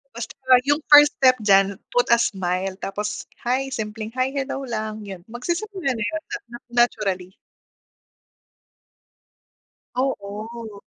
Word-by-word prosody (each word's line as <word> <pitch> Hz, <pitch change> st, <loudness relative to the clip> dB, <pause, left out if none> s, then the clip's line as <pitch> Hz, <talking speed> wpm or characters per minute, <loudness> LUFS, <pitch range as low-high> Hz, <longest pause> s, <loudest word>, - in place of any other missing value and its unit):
Basta 235 Hz, -1 st, -6 dB
wa 255 Hz, -1 st, +6 dB
yung 290 Hz, +1 st, +2 dB
first 295 Hz, 0 st, +9 dB
step 255 Hz, -2 st, +4 dB
dyan, 195 Hz, -1 st, +3 dB
put 245 Hz, -1 st, +1 dB
a 235 Hz, -, +6 dB
smile, 185 Hz, -2 st, -1 dB
tapos," 205 Hz, +2 st, -3 dB, 0.2 s
Hi," 265 Hz, +2 st, 0 dB
simpleng, 220 Hz, -1 st, -4 dB
"Hi, 255 Hz, +1 st, 0 dB
hello" 270 Hz, -1 st, -3 dB
lang 215 Hz, -2 st, -4 dB
yun, 185 Hz, -3 st, -8 dB
magsisimula 345 Hz, -, -3 dB
na 225 Hz, -, -2 dB
yun 210 Hz, 0 st, -2 dB
na -, -, -4 dB
na 240 Hz, -, -7 dB, 0.3 s
naturally. 190 Hz, -6 st, -2 dB, 2.6 s
Oo. 220 Hz, -3 st, -4 dB
225 Hz, 125 wpm, -23 LUFS, 200-260 Hz, 2.6 s, first